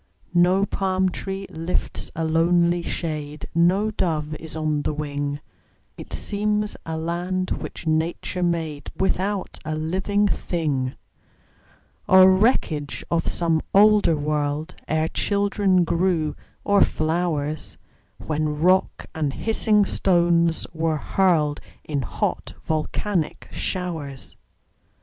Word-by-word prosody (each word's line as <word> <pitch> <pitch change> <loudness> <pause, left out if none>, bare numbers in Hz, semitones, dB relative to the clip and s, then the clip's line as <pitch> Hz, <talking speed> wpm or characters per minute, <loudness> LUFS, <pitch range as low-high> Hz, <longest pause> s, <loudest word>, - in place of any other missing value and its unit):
No 180 +3 +4
palm 190 -1 0
tree 195 +2 -5
lifts 165 +3 -3
a 165 0 -1
lonely 170 +2 +3
shade, 150 -3 -4
No 185 +6 +3
dove 155 -6 -1
is 160 -1 -6
on 155 -2 0
the 150 - -2
wing; 145 -1 -3 0.5
It - - -11
seems 210 0 -1
a 160 0 -3
land 175 +3 -2
which - - -5
Nature 160 +3 -1
made 165 -4 -1
Without 190 +1 -1
a 155 0 -3
living 190 +6 0
thing, 145 -10 -1 1.1
Or 185 0 +8
wreckage 170 - 0
of 165 -1 +1
some 165 -2 +2
older 205 -5 +5
world, 150 +2 -1
Ere 155 +1 +1
children 200 -2 +1
grew, 165 -2 0 0.3
or 200 -1 +3
flowers, 155 -2 -1 0.4
When 150 -1 -2
rocks 185 +3 +2
and 155 -4 -1
hissing 215 - +2
stones 170 -3 +2
were 160 -1 0
hurled 155 -3 +1 0.2
In 145 -3 -2
hot, 120 - -3
volcanic 160 +2 -2
showers. 160 -7 -4
170 Hz, 110 wpm, -23 LUFS, 155-185 Hz, 1.1 s, Or